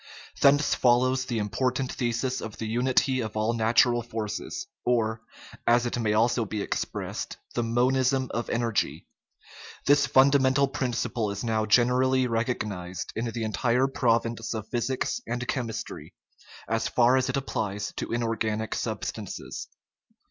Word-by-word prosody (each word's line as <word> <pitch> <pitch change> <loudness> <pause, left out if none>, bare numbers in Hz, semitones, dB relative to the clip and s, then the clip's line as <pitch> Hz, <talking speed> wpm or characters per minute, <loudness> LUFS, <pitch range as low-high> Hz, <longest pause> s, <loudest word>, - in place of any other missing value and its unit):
Thence 145 +1 +5
follows 130 +1 +3
the 120 -3 -2
important 125 +5 -1
thesis 120 +1 -1
of 110 -1 -7
the 110 - -4
unity 130 +3 +1
of 110 -2 -4
all 110 +2 +1
natural 120 +1 +3
forces, 110 -2 -4 0.2
or, 110 -2 +1 0.5
as 120 +1 +4
it 120 0 -2
may 110 -2 +1
also 115 +2 +2
be 105 -1 -3
expressed, - - -4 0.2
the 120 - 0
"monism 130 +3 +2
of 120 +1 -2
energy." 115 -2 -1 0.8
This 145 0 +4
fun 135 +1 +5
damental 135 0 +3
principle 120 -3 -1
is 100 0 -4
now 110 -2 0
generally 125 +3 +4
recognized 110 -7 -3
in 115 - -2
the 115 0 -3
entire 115 +4 +1
province 115 -3 0
of 110 -1 -5
physics 130 - -1
and 125 0 -3
chemistry, 115 -5 -4 0.5
as 115 0 0
far 125 +1 +4
as 130 0 +1
it - - 0
applies 105 -6 -3
to - - -4
inorganic 115 -2 -1
substances. - - -5
120 Hz, 140 wpm, -27 LUFS, 110-130 Hz, 0.8 s, Thence